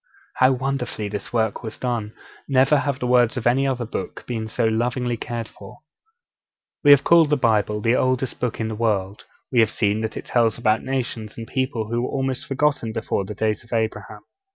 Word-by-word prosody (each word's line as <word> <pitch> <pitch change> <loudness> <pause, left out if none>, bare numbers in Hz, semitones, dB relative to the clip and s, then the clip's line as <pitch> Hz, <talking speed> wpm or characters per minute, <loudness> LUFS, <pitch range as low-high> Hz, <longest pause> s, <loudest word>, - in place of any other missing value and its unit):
How 130 +1 +5
wonderfully 125 -5 -3
this 105 0 -5
work 110 -3 0
was 110 -2 -7
done! 115 -4 -3 0.3
Never 135 +2 +4
have 140 -2 -1
the 125 - -4
words 125 -1 +3
of 120 - -4
any 130 +3 +3
other 125 -3 -1
book 115 - -6
been 115 -3 -3
so 110 - -1
lovingly 120 +2 0
cared 115 0 -5
for. 100 -2 -14 1.0
We 145 - +5
have 145 -1 +8
called 165 -3 +5
the 150 - +3
Bible 105 -3 +1
the 115 +3 +2
oldest 130 0 0
Book 125 -2 -2
in 110 - -1
the - - -4
world; 105 -3 -1 0.3
we 125 - +3
have 110 - +5
seen 105 0 0
that 110 0 -4
it - - -6
tells 115 -3 +2
about 110 -2 +2
nations 120 -5 -4
and 115 - -6
people 125 -4 -2
who 120 +1 0
were 125 - -2
almost 135 -2 -2
forgotten 140 -5 0
before 110 -3 -2
the 105 - -7
days 110 +1 -1
of 120 - -21
Abraham. 110 -2 -2
120 Hz, 200 wpm, -22 LUFS, 110-130 Hz, 1.0 s, have